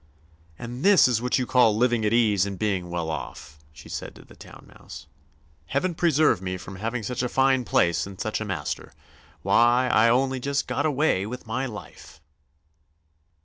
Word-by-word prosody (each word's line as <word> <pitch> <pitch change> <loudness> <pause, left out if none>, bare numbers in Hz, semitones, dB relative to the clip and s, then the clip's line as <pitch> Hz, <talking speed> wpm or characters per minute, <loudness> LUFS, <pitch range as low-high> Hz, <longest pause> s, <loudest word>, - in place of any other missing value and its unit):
"And 120 +3 -7
this 200 -6 +6
is 120 -3 0
what 125 0 0
you 130 - -1
call 120 -4 +3
living 120 -1 +1
at 105 - +1
ease 105 -5 +2
and 100 -1 -6
being 95 -4 -2
well 85 -2 -3
off," 75 0 -8
she 75 - -14
said - - -7
to - - -15
the - - -17
Town - - -14
Mouse. - - -12 0.6
"Heaven 170 +7 -1
preserve 155 - +2
me 95 -1 -4
from 95 +1 -10
having 115 +3 -3
such 120 +4 -3
a 125 - -2
fine 130 -1 +2
place 85 -2 +1
and 95 -1 -11
such 110 -1 -3
a - - -3
master! 100 -4 -5 0.5
Why, 120 +2 +3
I 115 -1 +4
only 130 +2 +1
just 140 +2 -2
got 145 +2 -1
away 140 -9 0
with 125 +3 -8
my 130 +4 -3
life!" 105 - -11
120 Hz, 185 wpm, -25 LUFS, 100-130 Hz, 0.6 s, this